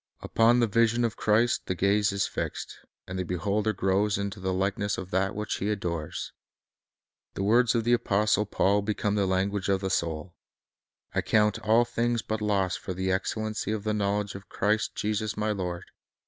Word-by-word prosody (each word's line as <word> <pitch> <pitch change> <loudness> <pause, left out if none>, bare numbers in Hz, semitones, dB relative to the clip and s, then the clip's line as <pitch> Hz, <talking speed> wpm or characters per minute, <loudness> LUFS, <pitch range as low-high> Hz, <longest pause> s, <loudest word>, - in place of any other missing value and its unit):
Upon 115 +2 +3
the - - +5
vision 115 +2 +2
of 115 - -2
Christ 115 +3 +2
the 95 - -1
gaze 100 +3 +2
is 100 -1 0
fixed, - - -5 0.3
and 95 +1 -4
the - - 0
beholder 100 +5 0
grows 100 +1 +1
into 100 -1 -4
the 95 0 -2
likeness 100 +2 -1
of 95 0 -7
that 95 +2 0
which 105 +1 -2
he 100 - -2
adores. 85 -7 -3 1.0
The 95 - -2
words 115 +4 +4
of 115 - +1
the 120 +2 +2
apostle 105 -2 +2
Paul 100 0 +2
become 105 0 -1
the 100 -2 +1
language 95 +1 0
of 95 -1 +2
the 95 -1 -2
soul: 85 0 -2 0.8
"I - - +1
count 105 0 +2
all 110 +2 +3
things 120 -1 -1
but 110 0 -3
loss 100 -3 +1
for 95 - -6
the 95 +1 -1
excellency 110 +2 -2
of 110 -2 -2
the 110 0 0
knowledge 100 0 -1
of 95 0 -10
Christ 105 +2 0
Jesus 105 0 -2
my 105 0 0
Lord 90 -3 -3
105 Hz, 185 wpm, -27 LUFS, 95-110 Hz, 1.0 s, the